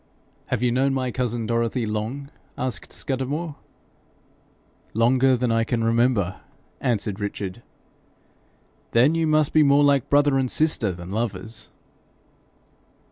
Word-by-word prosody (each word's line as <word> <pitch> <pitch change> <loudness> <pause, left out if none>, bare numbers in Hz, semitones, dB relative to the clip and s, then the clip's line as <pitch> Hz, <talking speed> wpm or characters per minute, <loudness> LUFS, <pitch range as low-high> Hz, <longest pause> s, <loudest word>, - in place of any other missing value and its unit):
'Have 120 - -1
you 125 - +3
known 135 +2 +1
my 130 -1 -1
cousin 120 -2 -2
Dorothy 115 +1 0
long?' 110 +7 -4 0.3
asked 130 -2 -4
Scudamore. 145 +4 -3 1.4
'Longer 130 +3 +4
than 120 -1 0
I 115 0 +2
can 115 0 -1
remember,' 115 -5 +1 0.4
answered 105 -4 -1
Richard. 100 0 -4 1.3
'Then 125 +7 +5
you 165 -1 +1
must 155 -1 +2
be 155 - +6
more 140 0 +5
like 140 -3 +3
brother 145 -1 +4
and 130 -1 0
sister 150 -10 +1
than 90 +1 -8
lovers.' 110 0 -4
125 Hz, 125 wpm, -24 LUFS, 115-140 Hz, 1.4 s, be